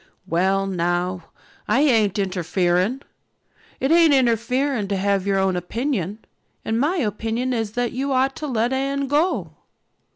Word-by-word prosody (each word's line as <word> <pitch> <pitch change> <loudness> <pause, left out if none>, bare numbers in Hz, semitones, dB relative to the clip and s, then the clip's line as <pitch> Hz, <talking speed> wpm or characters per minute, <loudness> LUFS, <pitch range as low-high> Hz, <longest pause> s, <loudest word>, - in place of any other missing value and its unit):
"Well 190 +4 +1
now, 175 -1 -1 0.4
I 265 - +3
ain't 225 -8 +3
interfering. 185 - 0 0.8
It 270 - 0
ain't 330 -3 +6
interfering 250 -1 +1
to 200 - -1
have 195 0 0
your 195 -1 +2
own 190 -1 +1
opinion. 215 - -3 0.4
And 225 +1 0
my 300 +8 +1
opinion 225 - -1
is 225 -3 -2
that 245 0 -1
you 270 +3 -2
ought 265 +1 +1
to 305 - -4
let 240 -1 0
Anne 275 +1 -1
go." 300 +6 0
225 Hz, 140 wpm, -22 LUFS, 195-265 Hz, 0.8 s, ain't